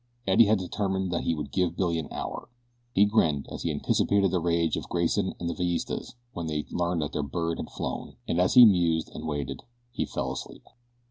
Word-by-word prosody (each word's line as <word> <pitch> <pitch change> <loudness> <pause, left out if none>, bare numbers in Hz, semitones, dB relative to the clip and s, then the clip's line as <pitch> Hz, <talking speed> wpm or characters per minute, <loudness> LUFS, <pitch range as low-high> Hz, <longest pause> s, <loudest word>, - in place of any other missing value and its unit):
Eddie 95 +4 +6
had 110 +1 +4
determined 95 0 -2
that 85 - -1
he 85 - +1
would 75 - -5
give 90 -2 0
Billy 85 -3 +1
an 80 - -5
hour. - - -5 0.4
He 100 -2 +5
grinned 80 -9 +2
as - - -6
he - - -1
anticipated 100 -2 +2
the 90 - +1
rage 85 -1 +1
of - - -6
Grayson 85 -1 0
and 85 - -3
the 85 - -1
Villistas 90 +7 -2 0.2
when 85 -2 -4
they 75 -1 -2
learned 85 -2 0
that 75 - -4
their 75 - -1
bird 85 +3 -2
had - - -5
flown, 70 - -5
and 85 - +1
as 90 - +2
he 125 -1 +11
mused 85 -6 +3
and - - -6
waited 70 -3 -3 0.3
he - - -2
fell - - -3
asleep. - - -7
85 Hz, 210 wpm, -27 LUFS, 80-95 Hz, 0.4 s, he